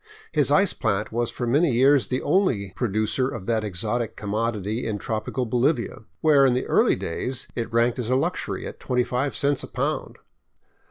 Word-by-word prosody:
His - - +3
ice 195 +1 +3
plant 105 -3 -1
was 120 +1 -1
for 120 - -4
many 140 +4 +2
years 135 +3 +4
the 130 - -2
only 115 - +1
producer 110 +2 0
of 95 - -6
that 110 -1 0
exotic 110 +4 -2
commodity 110 +1 -2
in 105 -2 -2
tropical 110 +4 -3
Bolivia, 120 +1 0 0.2
where, 145 -3 +5
in 130 -2 +4
the 125 - -1
early - - +3
days, 125 +9 -4
it 115 -1 -3
ranked 115 +2 +2
as 120 -2 -3
a 130 - +3
luxury 130 - -2
at - - -8
25 125 +2 -1
cents 140 -1 +1
a - - -6
pound. - - -3
120 Hz, 175 wpm, -24 LUFS, 110-130 Hz, 0.2 s, where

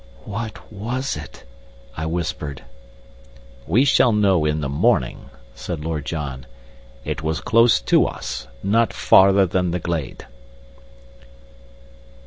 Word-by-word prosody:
"What 110 +1 -7
was 120 +7 -3
it?" 75 -2 -10 0.5
I 80 0 -3
whispered. 80 -4 -4 1.0
"We 115 - +3
shall 130 -3 +4
know 100 -6 +2
in 75 0 0
the 70 - -2
morning," 70 -3 0 0.2
said 75 +4 -6
Lord 80 -3 -3
John. 70 -5 -5 0.6
"It - - -3
was 80 0 -2
close 115 - +4
to - - +3
us - - -6 0.2
not 110 +3 +2
farther 95 0 +5
than 90 0 0
the 90 +1 -2
glade." 80 -5 -4
85 Hz, 115 wpm, -21 LUFS, 75-105 Hz, 1.0 s, farther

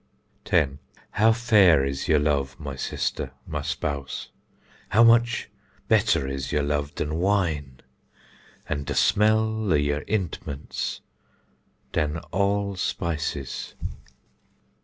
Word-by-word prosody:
10. 75 -9 +2 0.3
How 110 +3 +4
fair 105 - +5
is 70 +3 -3
yer 80 -3 +4
love, 70 -3 0
my 70 -3 -5
sister, - - -3
my - - -4
spouse! 70 -2 -4 0.6
how 115 - +5
much 120 +1 +4 0.4
better 100 - +3
is 65 0 -4
yer 75 - +1
love 75 0 -1
dan 75 +2 -2
wine! 85 -9 0 0.9
an 70 - -2
de - - -3
smell 110 0 +2
of 75 - +4
yer 75 0 0
ïntments 85 -8 -3 0.9
dan 75 0 0
all 100 +1 +1
spices. 80 -6 -3
80 Hz, 110 wpm, -25 LUFS, 70-105 Hz, 0.9 s, fair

